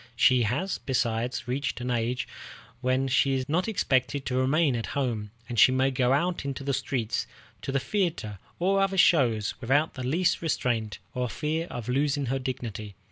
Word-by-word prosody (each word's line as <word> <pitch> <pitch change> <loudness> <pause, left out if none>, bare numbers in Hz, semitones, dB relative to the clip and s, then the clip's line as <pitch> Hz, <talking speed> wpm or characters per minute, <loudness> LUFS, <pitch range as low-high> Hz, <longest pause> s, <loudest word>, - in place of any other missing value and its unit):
She 125 +1 +5
has, 140 - -1
besides, 120 -2 -1
reached 135 +2 -2
an 125 0 -2
age 120 +1 -1 0.5
when 130 +1 +1
she 135 +1 +3
is 130 0 -2
not 175 +7 0
expected 130 - 0
to 125 - -2
remain 135 +2 +2
at 115 - -3
home, 115 -6 -1 0.2
and 120 -2 -2
she - - +8
may 130 +1 +2
go 125 -1 +1
out 170 +5 +1
into 135 -1 -4
the 140 0 -1
streets, 120 -4 -1 0.3
to - - -4
the 135 - +1
theatre, 165 - -2 0.2
or 195 +3 +2
other 195 0 +1
shows, 125 - +4
without 145 +6 +2
the 130 - -7
least 165 +8 +1
restraint 115 - -1 0.2
or 125 -1 -1
fear 160 +6 -2
of 120 -3 -6
losing 140 +2 +1
her 135 - 0
dignity. 115 -6 -5
130 Hz, 180 wpm, -27 LUFS, 120-145 Hz, 0.5 s, she